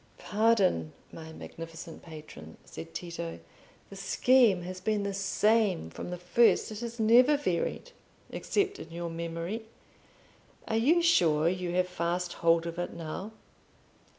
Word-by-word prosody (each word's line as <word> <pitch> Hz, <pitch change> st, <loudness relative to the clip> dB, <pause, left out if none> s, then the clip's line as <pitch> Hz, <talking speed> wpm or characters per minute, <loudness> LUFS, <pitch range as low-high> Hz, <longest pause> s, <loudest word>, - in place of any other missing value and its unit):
"Pardon, 200 Hz, -, +2 dB, 0.2 s
my 160 Hz, -1 st, -9 dB
magnificent 165 Hz, +1 st, -9 dB
patron," 155 Hz, -2 st, -11 dB
said 165 Hz, 0 st, -9 dB
Tito; 165 Hz, -, -6 dB, 0.5 s
"the -, -, -8 dB
scheme 205 Hz, 0 st, +3 dB
has 185 Hz, +1 st, -7 dB
been 215 Hz, -2 st, 0 dB
the 200 Hz, 0 st, -2 dB
same 195 Hz, -, +1 dB
from -, -, -7 dB
the 180 Hz, -, -4 dB
first—it 215 Hz, +3 st, +2 dB
has 235 Hz, 0 st, -6 dB
never 245 Hz, +6 st, +6 dB
varied 280 Hz, -, -2 dB, 0.4 s
except 405 Hz, -1 st, -1 dB
in 160 Hz, -, -9 dB
your 170 Hz, 0 st, -5 dB
memory. 170 Hz, +6 st, -4 dB, 1.0 s
Are 220 Hz, -, -1 dB
you 320 Hz, +10 st, +3 dB
sure 165 Hz, -, +4 dB
you 180 Hz, 0 st, -1 dB
have 180 Hz, 0 st, +2 dB
fast 175 Hz, 0 st, -2 dB
hold 165 Hz, 0 st, +4 dB
of 170 Hz, 0 st, -5 dB
it 175 Hz, -, -3 dB
now?" 170 Hz, +5 st, -6 dB
180 Hz, 135 wpm, -29 LUFS, 165-220 Hz, 1.0 s, never